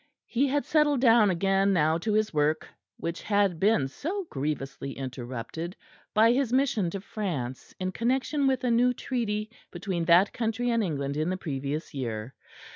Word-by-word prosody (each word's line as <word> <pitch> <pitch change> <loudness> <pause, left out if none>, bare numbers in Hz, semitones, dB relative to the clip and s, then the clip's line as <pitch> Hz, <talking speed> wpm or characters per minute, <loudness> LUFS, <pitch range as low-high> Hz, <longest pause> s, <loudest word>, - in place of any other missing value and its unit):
He 265 +4 +1
had 285 +2 0
settled 300 -3 +3
down 230 -4 +5
again 195 +2 +2
now 160 -1 +2
to 215 +4 -1
his 215 -2 +1
work 150 +1 +1 0.3
which 170 +1 -4
had 200 -5 +1
been 195 -9 +3
so 360 - -4
grievously 135 -1 -3
interrupted 130 - -6 0.4
by 225 +2 +6
his 255 -1 +1
mission 250 -8 +2
to 195 +2 -5
France 160 - -5
in 185 0 -2
connection 265 +6 0
with 260 -2 +1
a 245 - +2
new 245 +2 +3
treaty 215 -4 -2 0.2
between 175 -1 -3
that 175 +4 +5
country 240 +1 -1
and 230 -1 +2
England 140 -5 -2
in 155 +3 0
the 185 - -1
previous 145 -1 -4
year. 120 -2 -4
195 Hz, 165 wpm, -27 LUFS, 150-235 Hz, 0.4 s, by